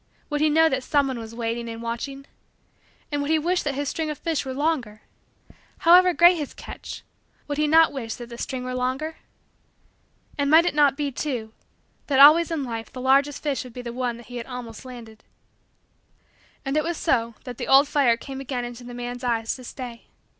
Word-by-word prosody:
Would 295 0 0
he 310 - +4
know 320 +2 +5
that 265 -4 0
someone 275 -4 +1
was 225 0 -9
waiting 235 0 -3
and 225 0 -6
watching? 240 +4 -5 0.9
And 290 -1 -1
would 285 - -3
he 320 - +4
wish 350 +4 0
that 285 -2 -2
his 285 +1 -2
string 315 +2 -2
of 300 - -4
fish 325 0 -2
were 260 - -3
longer? 270 -8 -1 0.7
However 360 +2 +6
great 345 +1 +6
his 295 -4 -5
catch, - - -9 0.4
would 290 0 -3
he 300 - +2
not 320 +1 +5
wish 230 -5 -4
that 240 - -9
the 235 - -9
string 255 -1 -4
were 255 0 -4
longer? 260 +6 -2 1.2
And 280 0 +1
might 320 +3 +7
it 355 - +1
not 290 -2 +4
be, 290 -2 -1
too, 245 -5 -4 0.5
that 275 - +1
always 310 +4 +8
in 320 -4 -2
life 230 -3 -5
the 255 - -8
largest 275 +2 +2
fish 285 -3 -1
would 250 -2 -12
be 250 - -7
the 235 -1 -6
one 245 -1 -2
that 235 - -13
he 245 0 -8
had 235 - -6
almost 250 -2 -8
landed? 235 -4 -11 1.4
And 270 +1 -2
it 305 - +2
was 335 0 -2
so 230 -7 0
that 250 -2 -8
the - - -4
old 275 +2 +6
fire 265 -6 +3
came 270 +2 -7
again 255 -2 -3
into 240 0 -8
the 245 0 -9
man's 245 +1 -6
eyes 230 -2 0
to 255 - -12
stay. 245 -2 -8
265 Hz, 210 wpm, -24 LUFS, 240-295 Hz, 1.4 s, always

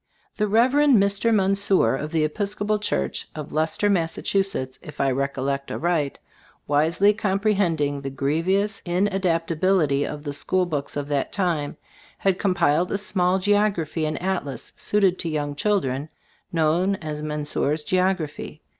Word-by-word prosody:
The 210 - +1
Rev. 230 +5 +4
Mr. 230 -7 +3
Menseur 195 -5 +3
of 150 +3 -5
the 160 -2 +1
Episcopal 205 +5 -1
church 205 - -2
of 150 -2 -7
Leicester, 160 +6 +1
Mass., 170 -5 +1
if 175 -6 -2
I 135 -1 +2
recollect 140 +1 -2
aright, 160 -5 -1 0.5
wisely 165 +8 +3
compre 205 +1 +1
hending 160 -8 0
the 135 - -4
grievous 170 +10 0
inadaptability 175 -4 +1
of 145 0 -5
the 145 -1 -4
school 185 +5 +1
books 145 -4 -3
of 145 -1 -3
that 140 -2 -1
time, 170 -7 -1 0.4
had 190 -2 +1
compiled 175 -3 +2
a - - +1
small 190 -3 +1
geography 190 -6 +1
and 155 - -3
atlas 180 -8 -3
suited 195 -3 +1
to 165 - -2
young 145 -2 -2
children, 145 -6 0 0.4
known 170 +4 +2
as 155 -4 -6
Menseur's 150 0 -1
Geography. 185 -4 -1
170 Hz, 135 wpm, -24 LUFS, 150-195 Hz, 0.5 s, Rev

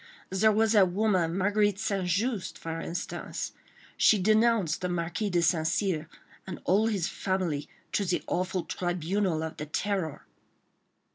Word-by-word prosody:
"There 210 +3 +4
was 220 +1 +3
that 200 -5 +5
woman, 185 -4 +1
Marguerite 205 +1 +2
St. 195 -3 -1
Just, 205 +3 -1
for 165 0 -5
instance. 170 +1 -4 0.5
She 215 - +5
denounced 215 -4 +3
the 180 - -1
Marquis 175 +4 -2
de 175 -2 +1
St. 160 -1 +2
Cyr 160 -5 0 0.4
and 190 - -6
all 205 +4 +3
his 195 -6 0
family 180 -7 -2 0.2
to 205 - +1
the 180 -2 -1
awful 180 0 -1
tribunal 175 -1 -1
of 160 - -5
the 150 - -5
Terror." 185 -2 -2
185 Hz, 145 wpm, -28 LUFS, 170-205 Hz, 0.5 s, that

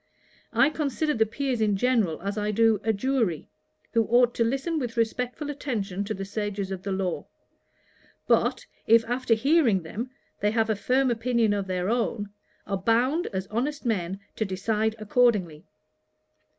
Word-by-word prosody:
I 240 +6 +4
consider 300 0 -1
the 220 -3 +2
Peers 255 +1 -2
in 205 -2 +2
general 225 -8 +1
as 200 +1 -2
I 210 0 -1
do 220 0 +3
a 225 - +2
Jury, 225 - 0 0.5
who 230 -2 +3
ought 240 +1 +4
to 230 - +1
listen 275 +7 -1
with 240 -4 -4
respectful 250 +6 -1
attention 210 -9 -3
to 215 +1 -3
the 195 - -5
sages 200 -1 -3
of 190 -1 -4
the 200 - -4
law; 190 -2 -2 1.0
but, - - +2 0.2
if 225 0 +6
after 245 0 +1
hearing 250 - +3
them, 225 +10 -5 0.3
they 205 - +2
have 220 0 +1
a - - +1
firm 255 +5 +2
opinion 230 -2 +1
of 200 -1 -2
their 185 -1 -1
own, 220 -2 -1 0.3
are 195 - -2
bound, 245 - +1
as 190 -2 -3
honest 275 +6 -2
men, 195 -4 -1 0.2
to - - +1
decide 215 +3 -1
accordingly. 210 -7 +1
225 Hz, 165 wpm, -26 LUFS, 200-250 Hz, 1.0 s, if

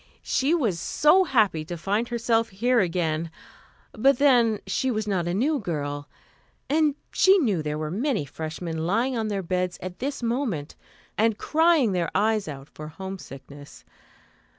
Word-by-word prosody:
She 280 +6 +1
was 220 - 0
so 330 - +4
happy 215 - +2
to 175 +1 -6
find 205 +7 -1
herself 230 -1 0
here 240 +6 +1
again; 165 -3 0 0.6
but 270 +4 +3
then 240 -6 +4
she 260 +7 -1
was 215 -3 -2
not 185 -4 0
a 175 - -1
new 285 +8 +1
girl, 145 - -4 0.6
and 300 0 +2 0.2
she 385 +1 +5
knew 215 - +1
there 150 0 -3
were 155 0 -4
many 225 - -1
freshmen 160 +2 -5
lying 235 +7 +1
on 225 -2 -1
their 200 -2 -2
beds 180 0 -2
at 180 0 -8
this 275 0 -4
moment 230 - -2 0.4
and 220 -1 +2
crying 320 -6 +3
their 175 -3 -1
eyes 215 -1 +1
out 140 -2 -8
for 155 - -8
homesickness. 150 -5 -10
205 Hz, 155 wpm, -25 LUFS, 165-250 Hz, 0.6 s, she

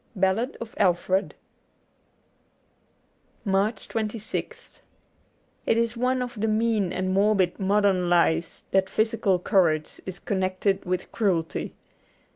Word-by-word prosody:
' - - -37
Ballad 225 +8 -1
of 230 -1 -7
Alfred: 185 0 +1 2.1
91 195 - -1
MARCH 200 +2 0
26th 220 -1 -4 0.9
IT 225 - +3
is 230 0 0
one 250 +1 +1
of 240 -4 -7
the 220 - +1
mean 215 -3 +1
and 185 0 -1
morbid 195 -2 +2
modern 195 -2 +2
lies 170 -1 +2
that 190 0 +2
physical 220 -3 +1
courage 175 -5 +1
is 185 -1 -5
connected 190 +1 -1
with 180 0 -3
cruelty. 180 -7 -1
195 Hz, 115 wpm, -25 LUFS, 185-220 Hz, 2.1 s, IT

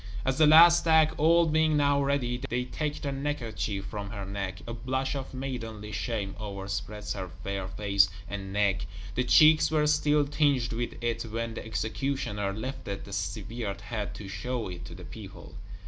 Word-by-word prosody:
As 130 +2 0
the 155 - +7
last 170 +2 +8
act, 160 -1 +5
all 165 +2 +5
being 155 -1 +3
now 140 -1 +3
ready, 125 -3 0
they 125 +1 0
take 150 +3 -3
the 140 - -1
neckerchief 115 -8 -3
from 100 0 -5
her 100 -2 -5
neck, 95 -1 -4
a 115 - -5
blush 130 +3 -2
of 135 -2 -5
maidenly 115 -5 -5
shame 100 -2 -2
overspreads 100 0 -4
her 95 -2 -5
fair 100 -1 -3
face 100 0 +2 0.2
and 100 -1 -5
neck; 100 -1 +1 0.3
the 125 - +1
cheeks 155 +5 +6
were 155 -1 +2
still 150 -1 +3
tinged 140 -4 +1
with 120 +1 -3
it 115 -1 0
when 115 +1 -3
the - - -6
executioner 110 -2 -2
lifted 110 -2 -5
the 100 - -9
severed 100 +2 -4
head, 105 -2 -4
to 105 - -8
show 110 +4 -3
it 90 -1 -7
to 85 - -9
the 90 0 -10
people. 95 +4 -10
115 Hz, 175 wpm, -28 LUFS, 100-140 Hz, 0.3 s, last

